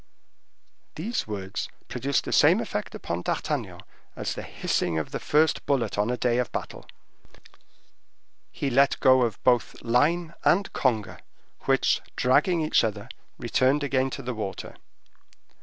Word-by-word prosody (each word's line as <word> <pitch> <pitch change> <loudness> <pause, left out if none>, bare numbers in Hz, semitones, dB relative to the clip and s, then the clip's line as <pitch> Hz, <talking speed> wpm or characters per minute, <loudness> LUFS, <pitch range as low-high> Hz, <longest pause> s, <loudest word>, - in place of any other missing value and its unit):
These 215 - -3
words 100 -3 -4 0.2
produced 140 -1 -1
the - - -5
same - - +5
effect - - -4
upon 85 +1 -4
D'Artagnan - - -3 0.3
as - - -3
the - - -6
hissing 80 - -1
of 80 - -3
the - - -3
first 155 0 +2
bullet 125 -7 0
on 105 +2 0
a 125 - -1
day 120 -1 +1
of 125 - -1
battle; - - -6 1.6
he 140 - -3
let 140 +3 +3
go 130 -1 +5
of 115 -5 0
both 125 -2 +2
line 155 +8 +1
and 195 +3 +2
conger, 115 -6 0 0.5
which, - - +2
dragging 155 +7 +3
each 155 -5 +3
other, 105 -2 -3 0.3
returned 135 +3 +1
again 135 -1 +1
to 135 - -7
the 125 +1 -3
water. 105 -4 -6
130 Hz, 140 wpm, -26 LUFS, 110-145 Hz, 1.6 s, same